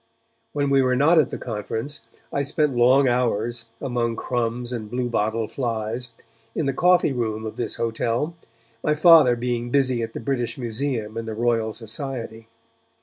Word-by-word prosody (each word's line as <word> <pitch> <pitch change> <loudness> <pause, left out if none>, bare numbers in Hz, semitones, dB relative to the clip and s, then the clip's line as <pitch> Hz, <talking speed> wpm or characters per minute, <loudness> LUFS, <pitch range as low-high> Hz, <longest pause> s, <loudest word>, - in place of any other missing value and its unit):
When 145 -1 0
we 135 -1 +5
were 130 -1 +2
not 155 +6 +5
at 145 - +3
the - - -4
conference, 115 +5 -4 0.3
I 140 - +1
spent 145 -1 0
long 130 +3 +5
hours, 120 -1 0
among 120 -4 -1
crumbs 120 +1 -2
and 110 -3 -5
bluebottle 115 -2 -1
flies, 115 0 -3 0.5
in 160 - 0
the 135 - 0
coffee 175 -1 +3
room 110 -3 -2
of 110 - -5
this - - -3
hotel, 115 +6 -1 0.5
my 150 - +2
Father 155 -6 +7
being 120 0 -2
busy 130 -2 +2
at 115 0 -4
the - - -5
British 120 +1 -2
Museum 115 -2 -3
and 115 0 -4
the 110 - -4
Royal 115 -1 +1
Society. 115 0 -5
120 Hz, 160 wpm, -23 LUFS, 115-135 Hz, 0.5 s, Father